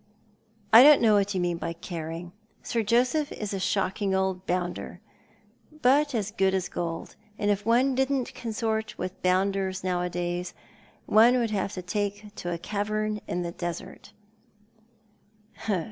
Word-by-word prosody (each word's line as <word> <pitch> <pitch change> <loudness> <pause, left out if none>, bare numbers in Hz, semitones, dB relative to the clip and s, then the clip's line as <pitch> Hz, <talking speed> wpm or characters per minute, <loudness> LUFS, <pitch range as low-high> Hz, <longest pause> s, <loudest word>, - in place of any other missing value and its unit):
" 215 -2 -35
I 230 - +11
don't 295 +2 +8
know 225 -2 +4
what 205 -1 +2
you - - +1
mean 175 -1 0
by 170 0 -4
caring. 170 0 -6 0.3
Sir 230 - -1
Joseph 250 +7 +1
is 210 -2 -5
a 195 - -2
shocking 190 +1 0
old 190 -1 -1
bounder, 180 0 -3 0.8
but 285 +2 +4
as 210 -2 -1
good 190 -1 +1
as 190 - -2
gold 165 -1 -4
— 210 0 -32
and 205 0 +1
if 205 +1 -2
one 250 +4 +4
didn't 265 0 0
consort 220 -2 -3
with 185 0 -5
bounders 190 +1 0
now^adays, 175 -1 -2 0.5
one 235 +4 +5
would 235 -3 0
have 200 -1 -1
to 185 - -6
take 205 +2 -3
to 175 - -4
a 170 - -2
cavern 210 +3 -2
in 175 +1 -2
the 170 - -4
desert." 175 +2 -7
200 Hz, 155 wpm, -27 LUFS, 180-220 Hz, 0.8 s, I